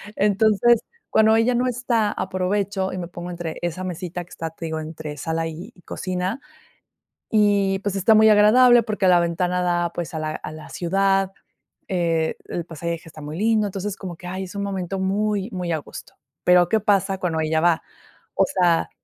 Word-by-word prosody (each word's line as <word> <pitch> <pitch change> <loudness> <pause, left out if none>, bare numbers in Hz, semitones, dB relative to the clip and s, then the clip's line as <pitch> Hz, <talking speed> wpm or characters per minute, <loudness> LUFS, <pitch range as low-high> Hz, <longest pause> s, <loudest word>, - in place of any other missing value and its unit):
Entonces, 215 +3 +3 0.3
cuando 220 0 +5
ella 225 +2 +3
no 250 +1 +1
está, 235 -3 0
aprovecho 190 +1 -1
y - - -4
me 175 -2 -4
pongo 175 0 -8
entre 170 -2 -5
esa 175 +1 -3
mesita 180 -1 -5
que - - -26
está, 165 0 -5
te 165 +1 -8
digo, 160 -1 -3
entre 155 -1 -7
sala 165 +2 -2
y 160 +2 -8
y 180 - -20
cocina. 185 +6 -3 0.9
Y, 200 -2 +3
pues, 200 0 -3
está 210 +4 +4
muy 220 0 +6
agradable, 235 +3 +6
porque 210 -3 0
la 180 -1 +6
ventana 180 +1 0
da, 175 -1 0
pues, 175 -1 -5
a 160 - -3
la 155 0 -2
a - - -7
la 155 0 -10
ciudad, 195 +2 +1 0.6
eh, 165 -3 0
el 170 - -3
paisaje 170 0 -4
está 160 -1 -12
muy 150 +2 -6
lindo. 215 0 +2
Entonces, 195 +1 -4
como 180 -3 -7
que, 180 - -12
ay, 185 +1 -4
es 185 - -10
un 200 - -2
momento 195 -1 -3
muy, 200 +1 0
muy 180 -2 -3
a 160 - 0
gusto. 145 - -11 0.3
Pero, 180 -1 +5
¿qué 220 - +3
pasa 195 -2 +1
cuando 165 -4 -1
ella 160 0 +1
va? 170 -1 +2 0.5
O - - +4
sea, 175 -8 +2
185 Hz, 190 wpm, -22 LUFS, 170-205 Hz, 0.9 s, muy